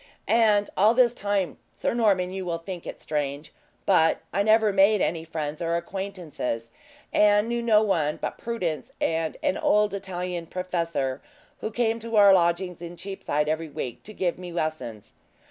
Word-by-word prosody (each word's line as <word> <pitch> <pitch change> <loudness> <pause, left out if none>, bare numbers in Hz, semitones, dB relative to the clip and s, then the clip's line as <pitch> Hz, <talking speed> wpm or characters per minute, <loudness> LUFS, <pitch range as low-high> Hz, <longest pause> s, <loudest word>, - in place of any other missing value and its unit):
And 215 -3 +4
all 215 +4 +4
this 245 -2 +5
time, 200 - -1 0.2
Sir - - -1
Norman 200 -6 +2
you 190 0 -4
will 170 -2 -2
think 175 +1 -8
it - - -7
strange 145 -1 -3 0.3
but 160 -4 +4
I 195 - +2
never 215 0 +4
made 200 +2 +5
any 165 -2 0
friends 155 -2 -4
or 170 0 0
acquaintances, 170 -11 -4 0.4
and 210 +1 +4
knew 235 0 -1
no 220 -2 +4
one 160 -8 +1
but - - -5
Prudence 185 -10 -3
and 160 -1 -1
an - - +1
old 210 -1 +3
Italian 180 -3 -4
professor, 170 -8 -2 0.4
who - - -3
came 225 0 0
to 230 0 -4
our 200 -2 +8
lodgings 175 0 +1
in 175 0 -8
Cheapside, 170 -5 -2
every 160 +1 -1
week, 125 -4 -5
to 215 - -11
give 180 -2 -1
me 180 -1 -7
lessons. 155 -10 -4
180 Hz, 165 wpm, -26 LUFS, 160-205 Hz, 0.4 s, our